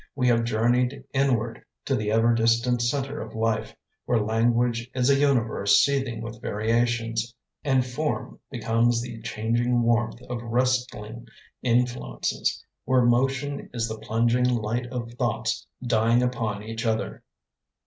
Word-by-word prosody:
We 125 -2 +2
have 115 -1 +3
journeyed 125 +4 +1
inward 125 -5 0 0.2
To - - +1
the 105 -1 -1
ever 115 +2 +3
distant 115 +1 +2
center 140 +4 -1
of - - -8
life, 110 -1 -1 0.3
Where 120 - +2
language 115 +2 +1
is 130 +1 +3
a - - +5
universe 120 -8 +3
Seething 135 -5 +1
with 115 0 -8
variations, 115 +1 0 0.3
And 130 -3 +2
form 150 +5 -3
becomes 115 -1 +1
the 120 -2 -8
changing 120 +2 0
warmth 115 0 +1
Of 125 -1 -5
wrestling 120 -2 -1 0.3
influences; 120 - -1 0.2
Where 130 -1 +3
motion 135 +4 +1
is 115 -1 0
the 110 -1 -6
plunging 115 +3 +1
light 120 0 -1
of 120 -2 -5
thoughts 115 -2 -1 0.2
Dying 115 +1 +3
upon 115 -5 -2
each 115 +1 -5
other. 110 -1 -1
120 Hz, 135 wpm, -25 LUFS, 115-125 Hz, 0.3 s, a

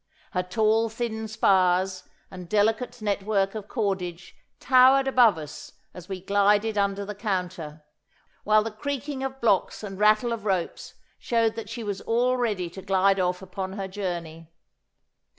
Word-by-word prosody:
Her 180 - 0
tall 220 +4 +1
thin 220 -1 -4
spars 185 -3 +2 0.3
and 180 -2 -9
delicate 220 +3 0
network 200 -1 0
of 215 -2 -7
cordage 185 -6 -3 0.2
towered 260 +1 +5
above 245 -8 +5
us 150 -2 -9 0.2
as 180 0 -11
we 190 -1 -4
glided 205 +2 +2
under 200 0 0
the 210 - -5
counter, 180 -7 -4 0.6
while 215 0 +4
the 225 - -4
creaking 280 +4 -4
of 270 0 -4
blocks 215 -3 +1
and 195 -2 -7
rattle 215 +3 +3
of 225 -3 -6
ropes 190 -5 -2 0.2
showed 230 -2 +1
that 225 -2 -7
she 230 0 -6
was 200 -2 -4
all 245 +2 +1
ready 215 -8 -1
to 190 - -9
glide 195 +1 +2
off 180 +1 -1
upon 190 0 -5
her 195 -1 -4
journey. 170 -4 -5
205 Hz, 150 wpm, -26 LUFS, 185-225 Hz, 0.6 s, towered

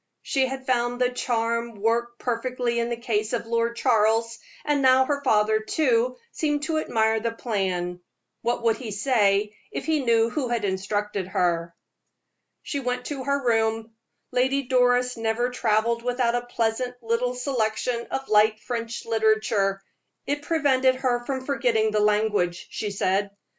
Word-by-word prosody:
She 265 -2 +1
had 265 0 -6
found 245 -1 0
the 250 0 +2
charm 235 -1 -1
work 235 +3 0
perfectly 245 0 -1
in 235 0 -1
the 235 - -2
case 220 -2 -1
of 235 - -1
Lord 230 0 0
Charles, 230 -1 +2 0.3
and 295 -1 +1
now 260 0 +5
her 285 0 -1
father, 215 -3 +3
too, 250 0 +1
seemed 295 -2 -1
to 315 0 0
admire 220 -5 +1
the 230 +1 -2
plan. 185 -6 -2 0.4
What 240 0 -1
would 225 -1 +2
he 245 -4 -7
say 210 -2 +1 0.2
if - - -5
he 310 -3 +1
knew 230 -1 +3
who 270 -1 -1
had 235 -3 -1
instructed 200 0 -2
her? 170 -2 0 0.9
She 285 - -3
went 250 -1 -3
to 275 -3 -5
her 280 -1 0
room. 225 -1 +1 0.4
Lady 260 +2 +1
Doris 250 -1 +2
never 225 +2 0
traveled 230 -1 +1
without 245 -1 0
a 245 0 -2
pleasant 245 +1 -1
little 235 +2 0
selection 240 -2 -1
of 270 0 -3
light 215 +1 +4
French 230 0 -5
literature 215 -3 +1 0.4
"it 290 +1 -2
prevented 270 -5 +2
her 250 -2 0
from 260 -1 -3
forgetting 240 -6 +1
the 210 - +1
language," 210 -4 +1
she 210 - -3
said. 200 0 0
235 Hz, 155 wpm, -25 LUFS, 220-255 Hz, 0.9 s, now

